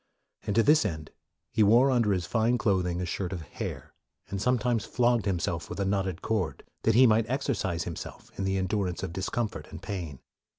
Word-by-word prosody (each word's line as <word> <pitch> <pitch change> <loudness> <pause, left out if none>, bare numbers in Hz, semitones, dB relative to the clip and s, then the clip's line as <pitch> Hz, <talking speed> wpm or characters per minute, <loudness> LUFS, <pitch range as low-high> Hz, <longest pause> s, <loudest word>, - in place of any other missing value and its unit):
And 100 - 0
to 115 - +5
this 150 +4 +5
end, 80 -7 -4 0.4
he - - +1
wore 120 +6 +6
under 115 -5 +3
his 90 -3 0
fine 115 +5 +2
clothing 90 -7 +1
a 90 - -1
shirt 90 +1 -3
of 90 -4 -4
hair, - - -6 0.4
and 100 -1 -3
sometimes 125 -1 +1
flogged 120 -1 +1
himself 85 -3 -1
with - - -6
a 100 - +1
knotted 95 -2 -1
cord, 105 -7 -1 0.2
that 110 - +2
he 130 +2 +8
might 110 -1 +3
exercise 115 - -1
him 85 - -5
self - - -9
in 100 - -3
the 95 0 0
endurance 95 -2 -1
of 90 -3 -4
discomfort 100 +4 -3
and - - -10
pain. 85 -9 -5
100 Hz, 200 wpm, -28 LUFS, 90-115 Hz, 0.4 s, he